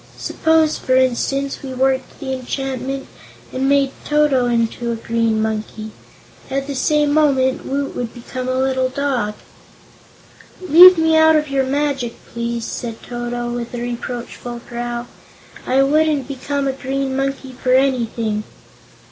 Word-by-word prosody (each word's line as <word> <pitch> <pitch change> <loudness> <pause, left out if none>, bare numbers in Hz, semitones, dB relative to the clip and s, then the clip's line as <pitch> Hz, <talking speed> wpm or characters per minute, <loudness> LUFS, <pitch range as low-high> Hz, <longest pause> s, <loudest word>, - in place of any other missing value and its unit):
"Suppose, 320 -1 +1
for 255 - +1
instance, 265 +2 +1
we 265 -2 -6
worked 260 0 0
the 265 -1 -3
enchantment, 270 +1 -4 0.5
and 265 +1 0
made 280 -1 +3
Toto 295 -4 +2
into 235 0 0
a - - -1
Green 230 -1 0
Monkey. 215 0 -3 0.6
At 275 0 -2
the 285 - -4
same 295 +2 +2
moment 270 -4 +2
Woot 275 +1 -2
would 240 -2 -3
become 255 +1 -6
a 255 - 0
little 260 0 +1
dog." 255 -6 -1 1.2
"Leave 365 +1 +9
me 320 0 +3
out 315 0 +6
of 300 -1 +1
your 270 -1 +1
magic, 275 -3 -1 0.2
please," 235 0 -3
said 230 -2 -6
Toto, 240 0 -4
with 240 0 -5
a - - -4
reproachful 240 0 -5
growl. 240 0 -4 0.6
"I 265 +2 +4
wouldn't 300 -1 +2
become 280 +1 -2
a 270 - 0
Green 270 0 -2
Monkey 270 0 -2
for 255 - +1
anything." 230 -5 0
260 Hz, 140 wpm, -19 LUFS, 240-280 Hz, 1.2 s, Leave